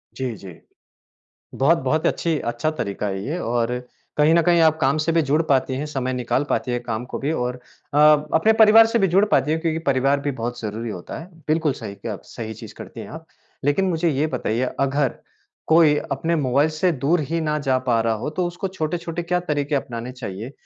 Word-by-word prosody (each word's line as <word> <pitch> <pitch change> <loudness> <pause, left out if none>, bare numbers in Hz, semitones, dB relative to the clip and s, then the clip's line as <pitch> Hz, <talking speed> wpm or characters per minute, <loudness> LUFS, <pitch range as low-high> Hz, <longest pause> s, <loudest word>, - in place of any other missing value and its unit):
जी, 130 -4 -3
जी। 95 -4 -12 1.0
बहुत 155 +6 +4
बहुत 155 +2 0
अच्छी 165 -3 0
अच्छा 120 +6 -1
तरीका 100 +1 -3
है 95 0 -3
ये 160 +5 -2
और 120 -2 -1 0.4
कहीं 150 +2 +5
न 170 - +5
कहीं 170 0 +4
आप 160 -1 +4
काम 135 +3 +3
से 155 +2 0
भी 165 0 +3
जुड़ 150 +2 +2
पाती 130 -1 +2
हैं, 145 +3 -3
समय 135 -4 -3
निकाल 125 +2 0
पाती 125 - -1
है 120 - 0
काम 120 -1 -4
को - - -6
भी 140 +3 -1
और 125 -5 -1 0.4
अ, 145 - +1 0.4
अपने 215 +7 +4
परिवार 220 0 +7
से 230 0 +1
भी 195 - +3
जुड़ 190 +4 +4
पाती 150 - +2
है 160 - +2
क्योंकि 160 -1 -1
परिवार 135 +1 +2
भी 145 0 -2
बहुत 120 -1 -4
ज़रूरी 110 +2 -4
होता 90 -5 -7
है। 165 - -10 0.2
बिल्कुल 155 -2 +1
सही 105 -5 -8
किया 110 +2 -5
आप 100 - -9
सही 110 -2 -7
चीज़ 110 - -11
करती - - -9
हैं - - -7
आप। - - -9 0.4
लेकिन 145 +7 +2
मुझे 170 -2 +1
ये 145 +2 0
बताइए, 125 -4 -1 0.2
अगर 135 -1 +1 0.5
कोई 160 -2 +5 0.2
अपने 165 +5 0
मोबाइल 140 +1 +2
से 160 +4 +1
दूर 150 +4 +1
ही 165 +4 -2
ना 150 -1 0
जा 135 -2 +1
पा 125 -3 +1
रहा 115 0 +1
हो, 110 +6 -3
तो 175 +4 -2
उसको 175 +3 -4
छोटे-छोटे 170 -1 -3
क्या 180 +1 0
तरीके 145 0 0
अपनाने 125 -2 -4
चाहिए, 115 -1 -7
140 Hz, 220 wpm, -22 LUFS, 125-160 Hz, 1.0 s, परिवार